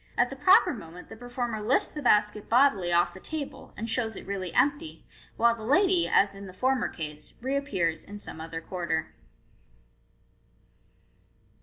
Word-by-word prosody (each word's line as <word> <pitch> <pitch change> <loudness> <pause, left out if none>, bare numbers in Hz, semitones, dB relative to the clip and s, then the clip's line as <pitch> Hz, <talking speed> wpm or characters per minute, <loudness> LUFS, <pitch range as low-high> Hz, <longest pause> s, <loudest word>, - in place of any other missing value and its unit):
At - - +2
the - - -5
proper 375 -5 +5
moment 180 -6 -10
the - - -9
performer 240 -1 -4
lifts 230 +5 +1
the 300 - -6
basket 210 -4 +2
bodily 225 -8 +3
off 175 0 +3
the 185 - -11
table, 300 +5 -6
and 225 - -4
shows 225 -2 0
it - - -9
really 190 -3 -4
empty, 290 +3 0 0.3
while 235 0 +4
the 230 - -9
lady, 360 - +3
as 200 0 +3
in 200 0 -9
the 185 - -11
former 255 +5 +1
case, 150 -2 -7
reappears 245 - -1
in 205 - -9
some 160 -5 -8
other 165 0 -6
quarter. 165 -3 -3
215 Hz, 160 wpm, -27 LUFS, 180-265 Hz, 0.3 s, proper